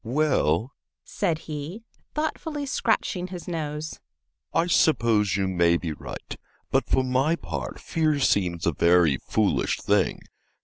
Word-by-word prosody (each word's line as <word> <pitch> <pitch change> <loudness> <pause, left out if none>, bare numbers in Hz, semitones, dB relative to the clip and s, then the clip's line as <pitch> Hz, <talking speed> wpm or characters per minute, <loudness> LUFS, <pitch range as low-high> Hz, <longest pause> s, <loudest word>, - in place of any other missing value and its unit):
"Well," 120 - +1 0.3
said 170 -6 -1
he, 155 +8 -6 0.3
thoughtfully 305 -1 -2
scratching 220 -8 0
his 180 -2 -8
nose, 155 -2 -4 0.5
"I 165 - +2
suppose 115 - +3
you 95 -1 0
may 85 -2 +3
be 85 -2 -4
right, - - -8 0.3
but - - +1
for 130 - +3
my 130 +5 +2
part - - -5
fear 155 -2 0
seems 90 -9 +1
a 85 - +2
very 85 -2 +4
foolish 105 - 0
thing. - - +1
140 Hz, 130 wpm, -25 LUFS, -, 0.5 s, very